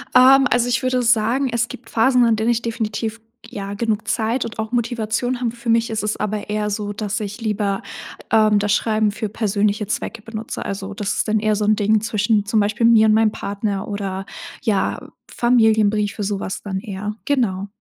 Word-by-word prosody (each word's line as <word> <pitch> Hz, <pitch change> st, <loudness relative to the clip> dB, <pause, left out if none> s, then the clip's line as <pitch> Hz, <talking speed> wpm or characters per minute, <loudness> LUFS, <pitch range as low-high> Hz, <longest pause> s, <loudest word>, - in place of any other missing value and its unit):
Ähm, 265 Hz, +2 st, +7 dB
also, 245 Hz, 0 st, +2 dB
ich 245 Hz, -, 0 dB
würde 255 Hz, -1 st, +1 dB
sagen, 235 Hz, +3 st, +2 dB
es 235 Hz, 0 st, 0 dB
gibt 225 Hz, -, -11 dB
Phasen, 245 Hz, +2 st, +3 dB
an 230 Hz, -1 st, +3 dB
denen 220 Hz, +2 st, 0 dB
ich 235 Hz, -, 0 dB
definitiv, 225 Hz, -1 st, -3 dB, 0.2 s
ja, 200 Hz, -3 st, -6 dB
genug 220 Hz, 0 st, -2 dB
Zeit 230 Hz, +3 st, 0 dB
und 230 Hz, -1 st, -8 dB
auch 220 Hz, 0 st, -3 dB
Motivation 240 Hz, +1 st, -1 dB
habe. 235 Hz, -2 st, 0 dB
Für 235 Hz, 0 st, -6 dB
mich 230 Hz, 0 st, +3 dB
ist 220 Hz, -1 st, -2 dB
es 210 Hz, -, -1 dB
aber 210 Hz, 0 st, -3 dB
eher 210 Hz, 0 st, -1 dB
so, 205 Hz, 0 st, -3 dB
dass 215 Hz, +1 st, -3 dB
ich 210 Hz, +2 st, -6 dB
lieber, 205 Hz, -3 st, -1 dB, 0.5 s
ähm, 215 Hz, -2 st, +4 dB
das 205 Hz, 0 st, 0 dB
Schreiben 215 Hz, -1 st, +1 dB
für 210 Hz, +1 st, -4 dB
persönliche 210 Hz, -1 st, 0 dB
Zwecke 230 Hz, -, -4 dB
benutze. 225 Hz, +1 st, -6 dB
Also, 195 Hz, 0 st, -5 dB
das 200 Hz, 0 st, -2 dB
ist -, -, -1 dB
dann 215 Hz, 0 st, +2 dB
eher 215 Hz, 0 st, +1 dB
so 210 Hz, 0 st, -1 dB
'n 215 Hz, -, +4 dB
Ding 210 Hz, 0 st, +2 dB
zwischen 210 Hz, -1 st, +1 dB
zum 215 Hz, +1 st, +1 dB
Beispiel 210 Hz, +3 st, +1 dB
mir 225 Hz, -1 st, +6 dB
und 215 Hz, -, +4 dB
meinem 220 Hz, -1 st, +3 dB
Partner 200 Hz, -1 st, -3 dB
oder, 195 Hz, -2 st, -4 dB, 0.4 s
ja, 205 Hz, -7 st, -1 dB, 0.2 s
Familienbriefe, 220 Hz, -3 st, +2 dB
so 200 Hz, 0 st, -2 dB
was 190 Hz, -, -5 dB
dann 190 Hz, -2 st, -4 dB
eher, 210 Hz, 0 st, -5 dB
genau. 220 Hz, -9 st, 0 dB
215 Hz, 200 wpm, -20 LUFS, 205-230 Hz, 0.5 s, Ähm